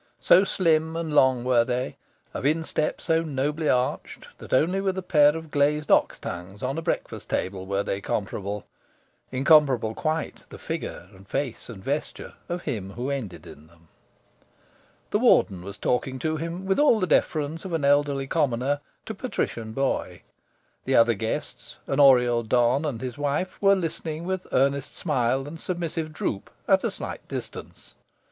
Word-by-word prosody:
So 185 - +6
slim 160 -4 +1
and 165 -2 -3
long 130 -4 +4
were 125 -2 +4
they, 125 +1 -2 0.4
of - - -5
instep 155 +1 0
so 165 0 +1
nobly 150 0 -1
arched, 125 0 -1
that - - -11
only 175 +9 +2
with 190 -1 -1
a 190 - -3
pair 150 -3 +4
of 160 -2 -9
glazed 150 +1 +1
ox - - +4
tongues 90 +5 -7
on 135 +5 -1
a - - -4
breakfast - - -3
table 95 0 -2
were 100 +1 0
they 100 0 -3
comparable. 100 -1 -3 0.7
Incomparable 135 -4 +4
quite, 160 +4 -3
the - - -10
figure 85 - -5
and 95 +1 -16
face 135 0 -3
and 100 -5 -9
vesture 145 +6 -3 0.2
of 175 0 -3
him 100 -9 -4
who 125 +5 -3
ended 100 - -5
in 75 +2 -13
them. 85 0 -24 1.2
The - - +2
Warden 95 -3 +4
was 100 +3 -8
talking 130 +1 -1
to 155 +3 -1
him, 170 +4 -5
with 195 +5 +1
all 290 -7 +5
the 185 - +1
deference 155 -2 0
of 165 -6 -2
elderly 140 -1 +2
commoner 135 -1 0 0.3
to 220 - -5
patrician 120 - -3
boy. 110 -8 -2 0.6
The 130 - +1
other 115 0 +6
guests 110 +1 -5
an 135 - -1
Oriel 125 -4 +6
don 120 +5 +2
and 135 -7 -2
his 130 +1 -5
wife 145 +6 -2
were 200 0 +6
listening 165 -2 -4
with 185 +1 -3
earnest 140 +1 +1
smile 135 -3 0
and 160 +2 -8
submissive 165 -3 -3
droop, 105 -9 -3 0.2
at - - +4
a - - +1
slight - - -7
distance. - - -8
140 Hz, 165 wpm, -25 LUFS, 115-160 Hz, 1.2 s, So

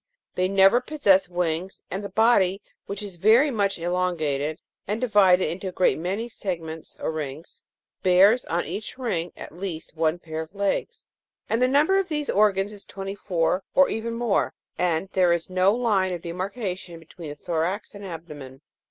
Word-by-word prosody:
They 185 0 +1
never 195 +5 +5
possess 200 -10 +3
wings, 175 +1 -2
and 190 +3 -3
the 200 - -5
body, 195 -3 +3 0.3
which 200 +1 -5
is 195 -4 -8
very 230 - +5
much 200 -4 0
elongated 165 -4 -1 0.3
and 210 +3 -1
divided 200 -6 +4
into 190 +3 -5
a - - -3
great 180 -3 +2
many 195 +7 -2
segments 165 -8 -6
or - - -2
rings, 155 0 -7 0.4
bears 195 +6 +5
on 170 +1 -1
each 215 +3 -6
ring, 180 -10 -2
at - - -8
least 175 -4 -6
one 160 +1 +1
pair 160 -2 -5
of 160 +5 -10
legs; 200 0 -2 0.4
the 245 +3 +3
number 300 +9 +4
of 385 - -1
these 300 -2 -1
organs 205 0 +2
is 205 - -11
twenty 195 0 -6
four, 185 -2 0
or 280 0 +6
even 230 +1 -3
more, 230 -3 0 0.2
and 175 0 0
there 180 -2 +4
is 170 +1 -3
no 185 +1 +4
line 210 -5 +1
of 175 -2 -5
demarcation 185 0 -4
between 165 0 -10
the 145 - -6
thorax 175 +6 -2
and 205 0 -10
abdomen. 150 -7 -9
190 Hz, 170 wpm, -25 LUFS, 170-210 Hz, 0.4 s, or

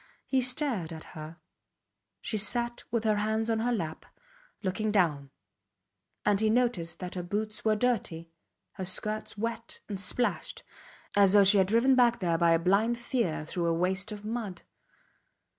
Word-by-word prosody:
He 265 -1 +1
stared 250 - 0
at 160 -1 -8
her. 155 +1 -9 0.8
She 215 - -2
sat 240 +3 -1
with 230 -1 -1
her 215 -2 +2
hands 220 +2 0
on 225 - +1
her 240 +2 0
lap, 165 -9 -4 0.6
looking 210 +3 -1
down; 155 -9 +1 1.0
and 205 -1 +3
he 220 0 +2
noticed 220 -9 +1
that 180 -1 -6
her 180 - -3
boots 210 +4 -3
were 215 -1 +3
dirty, 195 -8 -1 0.4
her 190 - -6
skirts 215 +3 -1
wet 230 +1 -4
and 200 -3 -4
splashed, 240 +5 -1 0.5
as 200 -1 +5
though 205 -1 +7
she 200 +1 +7
had 190 - +3
been 205 - -1
driven 250 +4 +5
back 240 -2 +4
there 170 -3 0
by 170 -1 +4
a - - +5
blind 200 +7 +2
fear 235 - -2
through 170 +1 -2
a 165 - +2
waste 190 +4 0
of 210 0 -8
mud. 215 -5 -4
210 Hz, 170 wpm, -29 LUFS, 180-230 Hz, 1.0 s, though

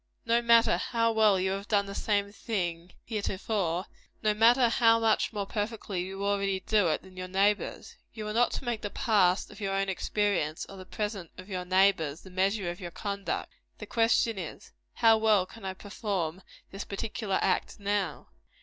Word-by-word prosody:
No 230 +1 +3
matter 235 -1 +5
how 230 -1 +1
well 215 -3 +4
you 190 +1 0
have 195 +2 -4
done 205 -2 +2
the 200 - -7
same 200 -1 0
thing 175 -6 -3
heretofore; 195 -4 -2 0.4
no 215 -1 +3
matter 235 +4 +5
how 230 -1 +4
much 225 -1 +2
more 205 -2 -3
perfectly 205 -3 -3
you 195 +2 -4
already 200 -1 0
do 210 -2 +2
it 155 - 0
than 185 -1 -15
your 185 0 -5
neighbors. 200 +3 0
You 215 -2 -6
are 210 - -3
not 240 +2 +3
to - - -4
make 235 -3 -2
the 205 - -3
past 195 -4 +2
of - - -13
your 195 -1 -1
own 195 0 0
experience, 190 -5 -1
or 195 - -11
the 185 -1 -10
present 205 -5 -4
of 185 +2 -11
your 180 -2 -3
neighbor's, 185 -5 +2
the 190 - -13
measure 190 0 0
of 175 - -9
your 175 -3 -6
conduct. 200 +2 -4 0.2
The - - -8
question 225 -2 +2
is - - -8 0.2
How 225 -2 +5
well 215 -4 +4
can 210 +1 -12
I 190 0 -3
perform 195 -4 -3 0.3
this 195 +1 -5
particular 205 -1 -3
act - - 0
now? 205 0 -2
200 Hz, 185 wpm, -29 LUFS, 190-220 Hz, 0.4 s, matter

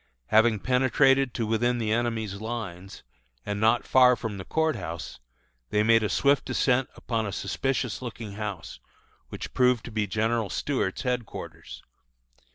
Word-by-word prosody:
Having 110 -1 +4
penetrated 135 +1 +3
to 115 - -1
within 120 +3 +1
the 110 -2 -1
enemy's 110 -3 -1
lines, 100 -5 -6 0.4
and 105 0 -3
not 115 +2 +3
far 125 -1 +6
from 110 -4 -5
the - - -5
Court 160 +6 0
House, 85 -5 -6 0.5
they 105 0 +2
made 115 +1 +5
a 105 - 0
swift 140 0 +3
descent 130 0 +1
upon 115 -3 -2
a - - -4
suspicious 125 +1 -2
looking 115 -4 -7
house, 100 -4 -6 0.5
which - - -7
proved 125 -2 +2
to 120 - -8
be 110 -1 -1
General 110 +1 0
Stuart's 130 -9 -2
headquarters. 125 -3 -5
115 Hz, 150 wpm, -27 LUFS, 105-125 Hz, 0.5 s, far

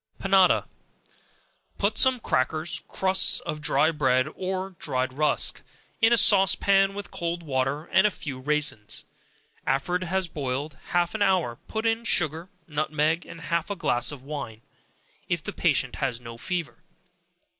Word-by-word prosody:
Panada. 195 -2 +4 1.1
Put 205 +2 0
some 260 +2 +3
crackers, 155 - -1
crusts 190 0 +3
of 150 - -5
dry 150 +2 +3
bread 130 -4 +2
or 190 +1 -3
dried 130 -2 -2
rusk, 150 +2 +1 0.4
in 225 +1 +5
a 235 - +5
sauce 195 -3 +6
pan 195 0 +2
with 205 0 -7
cold 170 0 -3
water, 135 0 -1
and 190 +3 +4
a - - +1
few 145 -9 -7
raisins; 145 -6 -1 0.6
after 135 +6 -1
it 180 - -6
has 190 +1 -1
boiled 140 -1 -4
half 175 -1 0
an 220 - -4
hour, 185 - +1
put 220 +1 -3
in 225 +1 +1
sugar, 165 -3 0 0.2
nutmeg, 155 +1 0
and 165 - -10
half 170 +1 -2
a 200 - -2
glass 120 -8 0
of 140 -3 -10
wine, 135 -7 -6 0.7
if - - -1
the - - -5
patient - - +1
has 125 -4 -2
no 115 -1 -9
fever. 170 +6 -4
160 Hz, 155 wpm, -26 LUFS, 140-190 Hz, 1.1 s, sauce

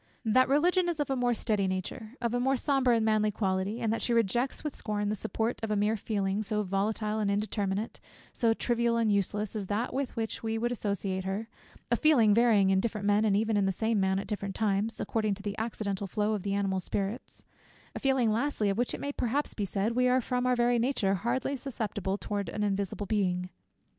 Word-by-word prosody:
That 255 +4 +4
Religion 350 +5 +3
is 335 -3 -2
of 290 -2 -1
a - - +2
more 245 -1 +1
steady 210 -3 0
nature; 190 +5 -4
of 235 -1 -1
a 245 - +1
more 265 +2 +2
sober 270 -2 +2
and 225 -2 +3
manly 215 -1 +3
quality; 195 +1 -1
and 225 -1 +1
that 230 - -2
she 240 - 0
rejects 235 +3 +1
with 300 -3 -4
scorn, 205 -1 -2
the 210 - 0
support 220 +3 -2
of 225 - -3
a 210 - +1
mere 210 +2 +2
feeling, 200 -1 -1
so 210 0 -1
volatile 210 +3 -1
and 210 -2 +1
indeterminate, 205 0 -1 0.3
so 230 -2 +2
trivial 235 -1 +1
and 225 -2 +2
useless, 205 +1 -1
as 205 -3 -3
that 215 +5 -1
with 270 0 -2
which 225 -2 -3
we 225 0 -2
would 240 +2 -1
associate 200 -4 -2
her; 200 +4 -3 0.4
a - - +5
feeling 245 -10 +5
varying 215 -4 +4
in 190 - +3
different 215 -1 -2
men, 205 +1 +3
and 205 -2 +3
even 220 +1 +1
in 200 -1 +2
the - - +2
same 220 +3 0
man 190 0 +2
at 195 - -3
different 200 -2 -4
times, 210 +1 0
according 215 -3 0
to 200 - -12
the 205 -1 -3
accidental 205 -3 -3
flow 210 +3 0
of 210 - -2
the 200 +1 -1
animal 195 -1 0
spirits; 200 +6 -4 0.5
a - - -5
feeling, 265 -4 +2
lastly, 225 -3 0
of 195 - -3
which 245 - 0
it - - -8
may 285 - -2
perhaps 280 +2 -1
be 205 - -2
said, 200 +3 -1
we 250 +2 +2
are 250 +1 +4
from 250 0 -1
our 250 - +3
very 240 0 +2
nature, 230 -6 +1
hardly 240 +7 -1
susceptible 215 -7 -3
towards 205 -3 -3
an 210 - -2
invisible 200 0 -1
Being. 180 -3 0
215 Hz, 225 wpm, -29 LUFS, 200-240 Hz, 0.5 s, a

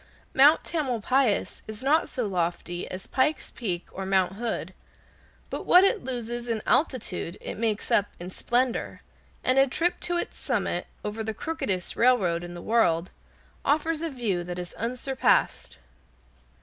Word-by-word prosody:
Mount 290 +4 +6
Tamalpais 255 -6 0
is 220 +3 -7
not 300 +4 +3
so 245 - -2
lofty 175 -2 -2
as 185 +1 -6
Pike's 285 +2 0
Peak, 180 -8 -3
or 190 - -5
Mount 190 -1 +2
Hood, 205 -4 -3 0.8
but - - -5
what 360 +1 +8
it 400 +2 +2
loses 240 -1 -3
in 225 -2 -2
altitude 215 - 0
it - - -5
makes 220 -1 -1
up 205 - +4
in 175 +1 -7
splendor, 245 +5 -1 0.4
and 255 +1 +4
a 270 - +6
trip 335 +7 +1
to 350 0 -1
its - - -4
summit, - - -1 0.2
over 210 +1 -3
the 220 0 -4
crookedest 195 - -2
railroad 195 -9 +3
in 175 0 -7
the 175 - -8
world, 185 -7 +2 0.5
offers 315 +2 +1
a 330 - -1
view 225 - -1
that 175 0 -6
is 175 -1 -6
unsurpassed. 250 +3 0
230 Hz, 150 wpm, -27 LUFS, 185-265 Hz, 0.8 s, what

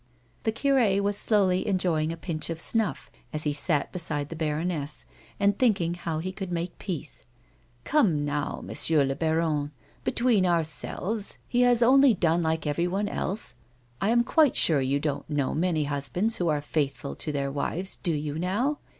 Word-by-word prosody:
The 220 - +2
cure 230 -5 +2
was 205 0 0
slowly 195 -3 +3
enjoying 175 -5 +1
a 165 - -5
pinch 165 -2 -4
of 165 -1 -4
snuff 220 +2 0 0.2
as 155 -1 -2
he 150 - 0
sat 145 0 +1
beside 150 -5 -2
the 165 - -6
baroness, 155 -1 -2 0.3
and 200 0 +2
thinking 195 -9 +2
how 170 -2 -4
he 180 +4 -3
could 190 -1 -6
make 170 0 -4
peace. 175 -7 -6 0.3
" 120 0 -36
Come 185 - +2
now, 145 0 -3
M. 155 +1 +1
le 135 - -1
baron, 160 -2 0 0.3
between 235 -5 +2
ourselves 175 +5 0
he 245 - +1
has 245 -1 +5
only 265 0 +6
done 170 -1 +2
like 160 -1 -1
everyone 175 +7 0
else. 205 - -2 0.5
I 200 - +2
am 235 +1 +4
quite 300 +2 +3
sure 150 -4 +3
you 135 +2 +1
don't 145 -1 -3
know 145 -3 0
many 165 -1 +1
husbands 150 +10 -1
who 175 - -1
are 150 -2 +1
faithful 145 -2 -2
to 155 - -4
their 140 -1 -2
wives, 175 +6 -2
do 175 - -2
you 150 0 -3
now?" 235 - 0
170 Hz, 175 wpm, -27 LUFS, 150-200 Hz, 0.5 s, only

